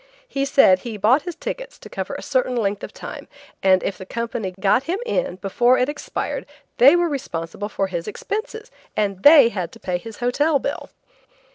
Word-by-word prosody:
He 275 Hz, -, -1 dB
said 230 Hz, -9 st, +5 dB
he 225 Hz, +1 st, -6 dB
bought 230 Hz, +8 st, +4 dB
his 350 Hz, 0 st, -6 dB
tickets -, -, -6 dB
to -, -, -12 dB
cover -, -, -5 dB
a -, -, -7 dB
certain 255 Hz, -2 st, 0 dB
length 205 Hz, -3 st, -1 dB
of -, -, -6 dB
time, -, -, -9 dB, 0.3 s
and 190 Hz, -1 st, +4 dB
if 190 Hz, -, -3 dB
the 190 Hz, -, -8 dB
company 230 Hz, -4 st, -3 dB
got 205 Hz, +7 st, +2 dB
him 355 Hz, +4 st, -1 dB
in 485 Hz, -, -1 dB
before 240 Hz, +7 st, +2 dB
it 250 Hz, -, +2 dB
expired 295 Hz, 0 st, -4 dB, 0.3 s
they 275 Hz, +6 st, +8 dB
were 350 Hz, 0 st, +2 dB
responsible 205 Hz, -, -4 dB
for 195 Hz, -, -1 dB
his 175 Hz, -3 st, -4 dB
expenses, 440 Hz, -, -5 dB, 0.3 s
and 200 Hz, -3 st, 0 dB
they 290 Hz, -3 st, +8 dB
had 180 Hz, -6 st, -4 dB
to -, -, -13 dB
pay 180 Hz, -2 st, -2 dB
his 225 Hz, +3 st, -10 dB
hotel 285 Hz, +5 st, +2 dB
bill. 280 Hz, +1 st, -4 dB
240 Hz, 190 wpm, -22 LUFS, 195-290 Hz, 0.3 s, they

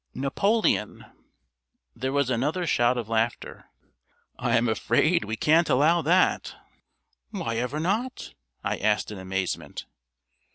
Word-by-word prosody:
"Napoleon." 170 Hz, -, 0 dB, 0.9 s
There 130 Hz, +2 st, -3 dB
was 140 Hz, -2 st, +1 dB
another 150 Hz, +9 st, -1 dB
shout 120 Hz, -5 st, +2 dB
of 120 Hz, -3 st, -3 dB
laughter. 115 Hz, +1 st, -2 dB, 0.7 s
"I 120 Hz, -2 st, +2 dB
am 120 Hz, +1 st, +1 dB
afraid 145 Hz, +9 st, +2 dB
we 110 Hz, +1 st, -3 dB
can't 160 Hz, +7 st, +3 dB
allow 160 Hz, +6 st, +3 dB
that." 180 Hz, +4 st, +2 dB, 0.7 s
"Why 170 Hz, -, -3 dB
ever 125 Hz, +5 st, -2 dB
not?" 215 Hz, +10 st, -2 dB, 0.3 s
I -, -, -1 dB
asked 105 Hz, +1 st, 0 dB
in 105 Hz, -, -7 dB
amazement. 95 Hz, 0 st, -4 dB
130 Hz, 120 wpm, -26 LUFS, 115-170 Hz, 0.9 s, can't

